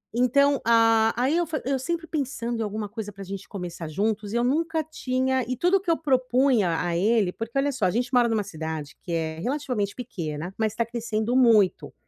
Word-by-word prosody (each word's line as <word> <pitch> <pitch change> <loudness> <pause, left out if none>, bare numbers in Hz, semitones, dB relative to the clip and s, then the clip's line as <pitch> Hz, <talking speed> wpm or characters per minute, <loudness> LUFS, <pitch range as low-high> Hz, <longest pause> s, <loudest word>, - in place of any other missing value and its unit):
Então 280 +3 +3
a 225 -1 +4
aí 270 +7 +2
eu 345 - +1
fa 310 -2 -3
eu 270 -1 0
sempre 335 +4 -3
pensando 245 -6 -3
em - - 0
alguma 210 0 -4
coisa 210 -2 -6
pra 195 0 -9
gente 195 +1 -7
começar 175 -4 -6
juntos 210 +4 -1
e - - +1
eu 240 - +2
nunca 320 +4 0
tinha 260 -3 -1
e 255 - -1
tudo 370 +2 +3
que 370 - -5
eu - - +4
propunha 255 - +2
a 170 -1 -1
ele 205 -1 +2
porque, 225 +6 -5
olha 285 +1 +1
só, 245 -7 -1
a - - +4
gente 245 +3 -2
mora 245 -1 +5
numa 215 -2 +1
cidade 160 -4 -6
que 170 - -5
é 160 -1 -2
relativamente 250 - -2
pequena, 175 -8 -5
mas 220 -1 -1
tá 230 - 0
crescendo 230 0 -2
muito, 225 -7 +4
230 Hz, 210 wpm, -25 LUFS, 200-260 Hz, -, mora